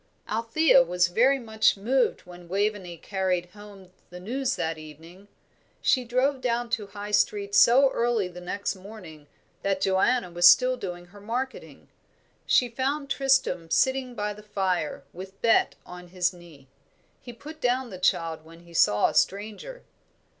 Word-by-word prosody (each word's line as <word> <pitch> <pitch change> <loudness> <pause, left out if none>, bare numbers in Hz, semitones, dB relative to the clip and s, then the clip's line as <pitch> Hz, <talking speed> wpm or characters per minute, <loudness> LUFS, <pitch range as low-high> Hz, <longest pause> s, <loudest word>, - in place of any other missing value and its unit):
Althea 230 +7 +3
was 180 -7 +1
very 250 +9 +3
much 220 -4 +1
moved 250 +6 0
when 175 -1 -14
Waveney 195 -2 -2
carried 185 -1 -2
home 205 -3 -14 0.2
the 180 - -10
news 255 +7 -2
that 160 0 -3
evening. 165 +6 -14 0.5
She 255 - +2
drove 255 +3 0
down 240 -1 -1
to 215 -4 -2
High 205 +1 -8
Street 205 -1 0
so 265 +6 +6
early 235 -5 0
the 180 0 -11
next 200 +3 -3
morning 185 -7 -12 0.3
that 195 -1 -1
Joanna 190 +1 +1
was 175 +1 +7
still 255 0 +4
doing 180 -6 -7
her 205 - -14
marketing. 250 +5 -6 0.6
She 250 - +4
found 270 +4 -3
Tristram 265 -12 +1
sitting 260 +4 +1
by 210 -1 -3
the 210 - -13
fire, 190 -6 -2
with 190 +2 -10
Bet 230 -1 +3
on 180 0 -11
his 180 0 -1
knee. 165 -6 -16 0.5
He 245 - -9
put 305 +6 -12
down 250 -1 0
the 185 - -8
child 165 -3 0
when 165 +1 -16
he 170 0 -17
saw 105 -10 +3
a - - -7
stranger. 215 - -2
205 Hz, 155 wpm, -26 LUFS, 180-245 Hz, 0.6 s, was